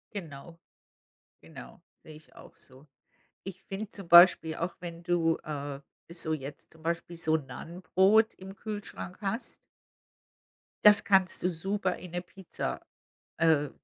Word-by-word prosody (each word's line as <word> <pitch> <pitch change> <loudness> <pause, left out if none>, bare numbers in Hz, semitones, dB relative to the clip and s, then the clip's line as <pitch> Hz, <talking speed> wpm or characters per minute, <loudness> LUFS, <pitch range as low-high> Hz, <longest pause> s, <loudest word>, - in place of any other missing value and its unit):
Genau, 165 -2 -8 0.8
genau, - - -13 0.2
sehe 155 - -12
ich 155 +1 -18
auch - - -15
so. 130 +2 -14 0.6
Ich 195 -2 -8
finde 200 +2 -6
zum 195 -4 -10
Beispiel 170 -2 +7
auch, 170 +1 -3
wenn 170 -1 -8
du, 165 -2 +2
äh, 145 -2 -5 0.3
so 165 -2 -2
jetzt 145 -1 -7
zum 160 - -17
Beispiel 170 +1 -3
so 160 -1 +1
'n 150 -4 -8
Naan-Brot 190 - +2
im 190 +1 -11
Kühlschrank 205 -4 -7
hast 205 +4 -4 1.3
das 210 -1 +8
kannst 190 -2 +3
du 180 - +2
super 190 +2 -2
in 180 - -11
'ne 175 +1 -3
Pizza, 185 0 -6 0.6
äh, 160 -3 +3
170 Hz, 140 wpm, -29 LUFS, 160-190 Hz, 1.3 s, das